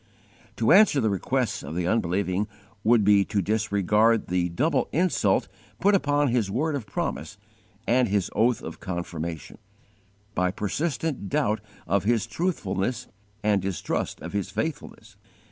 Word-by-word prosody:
To 110 Hz, +1 st, +2 dB
answer 190 Hz, -6 st, +6 dB
the 110 Hz, -4 st, +1 dB
requests 95 Hz, -, -1 dB
of 80 Hz, -, -7 dB
the 90 Hz, 0 st, -1 dB
unbelieving 95 Hz, 0 st, 0 dB, 0.4 s
would 115 Hz, -1 st, +4 dB
be 100 Hz, 0 st, +5 dB
to 105 Hz, -, -1 dB
disregard 105 Hz, +1 st, +2 dB
the 90 Hz, -1 st, +1 dB
double 145 Hz, -, 0 dB
insult 180 Hz, +4 st, +2 dB, 0.3 s
put 205 Hz, -, +4 dB
upon 145 Hz, -6 st, +2 dB
His 115 Hz, -5 st, +1 dB
word 150 Hz, +10 st, 0 dB
of 125 Hz, -7 st, -5 dB
promise -, -, -4 dB, 0.5 s
and 125 Hz, +1 st, +3 dB
His 100 Hz, -3 st, 0 dB
oath 115 Hz, +2 st, +2 dB
of -, -, -7 dB
confirmation, 85 Hz, -4 st, -5 dB, 0.7 s
by 90 Hz, -1 st, +1 dB
persistent 125 Hz, -, -2 dB
doubt 130 Hz, -8 st, 0 dB, 0.2 s
of 95 Hz, +3 st, +1 dB
His 115 Hz, -2 st, +2 dB
truthfulness 115 Hz, -, -2 dB, 0.3 s
and 105 Hz, -2 st, +2 dB
distrust 95 Hz, -3 st, -3 dB
of -, -, -7 dB
His 100 Hz, -2 st, -2 dB
faithfulness. 110 Hz, +10 st, -5 dB
105 Hz, 140 wpm, -26 LUFS, 95-130 Hz, 0.7 s, answer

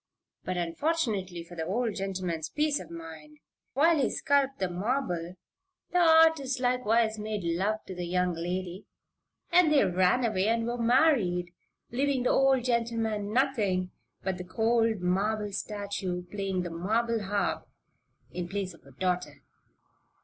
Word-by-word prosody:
But, 185 Hz, 0 st, -3 dB
unfortunately 190 Hz, -, -1 dB
for 170 Hz, -, -14 dB
the 160 Hz, -1 st, -4 dB
old 230 Hz, +3 st, 0 dB
gentleman's 185 Hz, -5 st, -3 dB
peace 300 Hz, -, 0 dB
of -, -, -10 dB
mind 160 Hz, -2 st, -10 dB, 0.4 s
while 320 Hz, +4 st, +4 dB
he 265 Hz, -, +2 dB
sculped 275 Hz, -1 st, +1 dB
the 190 Hz, -, 0 dB
marble 180 Hz, -3 st, -2 dB, 0.6 s
the 360 Hz, -, +2 dB
artist 320 Hz, -5 st, +5 dB
likewise 235 Hz, -3 st, +1 dB
made 210 Hz, -2 st, -3 dB
love 190 Hz, +6 st, -1 dB
to 190 Hz, -, -7 dB
the 180 Hz, -1 st, -5 dB
young 180 Hz, 0 st, +1 dB
lady 180 Hz, +3 st, -4 dB, 0.6 s
and 345 Hz, -2 st, +5 dB
they 285 Hz, -8 st, +5 dB
ran 185 Hz, +6 st, +2 dB
away 205 Hz, -3 st, +1 dB
and 230 Hz, 0 st, +1 dB
were 240 Hz, +1 st, -3 dB
married, 230 Hz, -, +2 dB, 0.4 s
leaving 265 Hz, +1 st, 0 dB
the 250 Hz, -, +2 dB
old 270 Hz, -2 st, +3 dB
gentleman 225 Hz, -4 st, -1 dB
nothing 210 Hz, -8 st, +1 dB, 0.3 s
but 190 Hz, -1 st, -2 dB
the -, -, -4 dB
cold 225 Hz, +2 st, +1 dB
marble 205 Hz, +4 st, 0 dB
statue 200 Hz, -3 st, -4 dB
playing 195 Hz, -3 st, -2 dB
the 175 Hz, -, -5 dB
marble 220 Hz, +7 st, 0 dB
harp, 200 Hz, +1 st, -2 dB, 0.6 s
in 175 Hz, -1 st, -4 dB
place 195 Hz, -1 st, -3 dB
of 165 Hz, -, -19 dB
a -, -, -14 dB
daughter. 180 Hz, +4 st, -2 dB
205 Hz, 145 wpm, -29 LUFS, 180-245 Hz, 0.6 s, artist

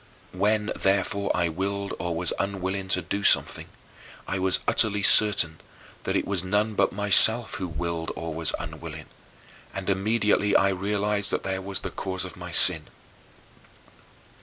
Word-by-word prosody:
When, 105 Hz, +3 st, +1 dB
therefore, 100 Hz, +1 st, 0 dB
I 85 Hz, -1 st, +2 dB
willed 100 Hz, +4 st, -3 dB
or 85 Hz, 0 st, -2 dB
was 85 Hz, 0 st, -1 dB
unwilling 95 Hz, -1 st, -2 dB
to 90 Hz, -1 st, +1 dB
do 100 Hz, +4 st, -3 dB
something, -, -, +3 dB, 0.6 s
I 95 Hz, -, -2 dB
was 95 Hz, 0 st, +2 dB
utterly 105 Hz, -2 st, +1 dB
certain 95 Hz, -7 st, +4 dB, 0.5 s
that -, -, -1 dB
it -, -, +1 dB
was 95 Hz, -3 st, -1 dB
none 105 Hz, +3 st, 0 dB
but -, -, +2 dB
myself 105 Hz, +3 st, +3 dB
who 90 Hz, -, -2 dB
willed 85 Hz, 0 st, -3 dB
or 80 Hz, -1 st, -5 dB
was 80 Hz, 0 st, -2 dB
unwilling -, -, -7 dB, 0.7 s
and 95 Hz, 0 st, -1 dB
immediately 105 Hz, +1 st, +1 dB
I 100 Hz, -, +5 dB
realized 100 Hz, +1 st, -1 dB
that -, -, -2 dB
there 95 Hz, 0 st, -2 dB
was 95 Hz, 0 st, -4 dB
the -, -, -5 dB
cause 95 Hz, -1 st, -4 dB
of 90 Hz, -, -9 dB
my 90 Hz, -1 st, -8 dB
sin. 85 Hz, -3 st, +2 dB
95 Hz, 155 wpm, -26 LUFS, 90-100 Hz, 0.7 s, I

